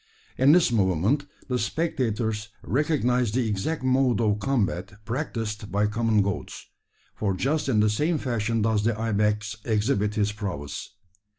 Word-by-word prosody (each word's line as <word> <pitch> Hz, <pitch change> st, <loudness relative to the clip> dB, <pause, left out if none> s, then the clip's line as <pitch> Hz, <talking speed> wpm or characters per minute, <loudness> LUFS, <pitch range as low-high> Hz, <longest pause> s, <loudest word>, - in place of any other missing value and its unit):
In 135 Hz, +3 st, +5 dB
this 165 Hz, -5 st, +5 dB
movement 105 Hz, -, +1 dB, 0.2 s
the 125 Hz, -1 st, 0 dB
spectators 115 Hz, -7 st, -1 dB, 0.2 s
recognised 125 Hz, -4 st, +1 dB
the 125 Hz, -3 st, +1 dB
exact 110 Hz, +9 st, -2 dB
mode 130 Hz, -3 st, +2 dB
of 105 Hz, -2 st, +1 dB
combat 105 Hz, -7 st, -1 dB
practised 115 Hz, -5 st, -4 dB
by 105 Hz, +1 st, +2 dB
common 110 Hz, -1 st, +2 dB
goats; 100 Hz, -1 st, -4 dB, 0.5 s
for 100 Hz, -3 st, -1 dB
just 140 Hz, +9 st, 0 dB
in 110 Hz, -5 st, +3 dB
the 105 Hz, -, +4 dB
same 155 Hz, +10 st, +1 dB
fashion 115 Hz, -4 st, -1 dB
does 110 Hz, -2 st, +1 dB
the 110 Hz, -1 st, 0 dB
ibex 105 Hz, 0 st, 0 dB
exhibit 105 Hz, -1 st, 0 dB
his 105 Hz, 0 st, +1 dB
prowess. 100 Hz, -6 st, -6 dB
110 Hz, 140 wpm, -26 LUFS, 105-130 Hz, 0.5 s, In